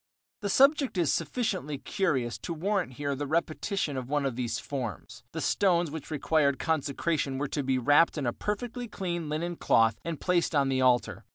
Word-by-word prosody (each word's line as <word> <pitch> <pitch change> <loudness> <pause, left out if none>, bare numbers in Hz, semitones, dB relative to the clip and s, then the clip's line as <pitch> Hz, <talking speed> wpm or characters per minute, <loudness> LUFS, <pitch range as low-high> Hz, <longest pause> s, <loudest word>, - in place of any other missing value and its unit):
The 200 - -3
subject 275 0 +4
is 170 -5 +2
sufficiently 185 - -2
curious 135 - -1
to 170 - -5
warrant 185 -3 -1
here 145 +2 -2
the 145 +1 -3
repetition 160 0 -1
of 130 -1 -5
one 145 -1 0
of 135 -3 -1
these 120 -2 -2
forms. 125 - -6
The - - -4
stones 175 -5 +2
which 160 -2 -7
required 150 -2 +2
consecration 150 -2 -1
were 145 +1 -2
to 145 - -1
be 135 -1 +1
wrapped 145 +7 +4
in 145 - -2
a 120 - 0
perfectly 240 - -4
clean 175 -6 -4
linen 170 +3 -2
cloth 115 -1 +3
and 165 -3 -4
placed 175 -3 +1
on 140 -2 +3
the 130 -1 +1
altar. 125 -1 +2
150 Hz, 185 wpm, -29 LUFS, 135-175 Hz, -, subject